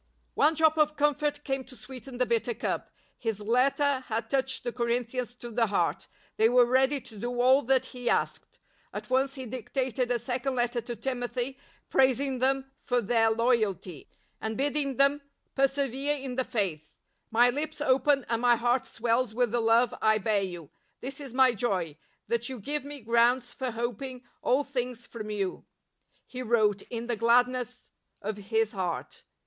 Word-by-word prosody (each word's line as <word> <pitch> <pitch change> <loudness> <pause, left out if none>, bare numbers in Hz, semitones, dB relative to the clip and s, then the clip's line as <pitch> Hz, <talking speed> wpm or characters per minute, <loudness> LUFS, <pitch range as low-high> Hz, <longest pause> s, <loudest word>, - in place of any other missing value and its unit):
One 310 +2 +3
drop 315 0 +3
of 305 0 +3
comfort 295 0 +1
came 270 -1 -2
to 255 - -12
sweeten 250 +2 -9
the 250 - +2
bitter 235 0 0
cup. - - -3 0.3
His 225 -3 -2
letter 260 +5 +2
had 225 0 -3
touched 265 -1 0
the 240 - -2
Corin 235 0 0
thians 245 0 -5
to 240 -1 -8
the 230 0 +2
heart; 200 - 0 0.3
the}^ 220 +1 +6
were 250 0 +6
ready 265 +3 +3
to 220 -4 -11
do 245 +2 -3
aU 260 +3 +5
that 260 0 +3
he 245 -1 -4
asked. - - -1 0.3
At - - -7
once 270 +2 +2
he 260 -2 -6
dictated 255 +1 -2
a 245 - +2
second 255 +3 -2
letter 240 0 0
to 235 +1 -6
Timothy 245 +2 -3 0.3
praising 265 0 +3
them 270 +1 +1
for 245 -1 +1
their 225 0 +3
loyalty, 220 - 0 0.3
and 220 0 -3
bidding 280 -1 0
them 280 +1 +4 0.2
" - - -48
persevere 275 +1 +1
in 265 -3 -5
the 260 - +1
Faith." 160 -9 -3 0.2
" - - -47
My 240 +2 +5
lips 305 +4 -4
open 275 -1 +3
and 230 0 -1
my 245 -1 +5
heart 240 +2 +1
swells 230 0 0
with 245 -2 +2
the 240 0 +1
love 230 +1 +4
I 215 0 +4
bear 210 0 +1
you... 175 -5 -6 0.3
this 275 +2 -5
is 275 -3 -7
my 255 0 +5
joy, 190 -9 -1 0.3
that 235 +1 -1
you 260 -2 -6
give 290 +8 -2
me 285 -1 -8
grounds 235 +2 +2
for 260 -2 -3
hoping 245 +2 -4 0.2
all 270 +3 +2
things 250 -3 -4
from 215 -3 -7
you," 200 -3 -3 0.6
he 255 - -7
wrote 215 -4 +2
in 235 -1 -4
the 240 0 -1
gladness 245 +2 +1 0.3
of 210 +1 -4
his 220 +2 0
heart. 180 -4 -4
245 Hz, 180 wpm, -28 LUFS, 230-265 Hz, 0.6 s, the}^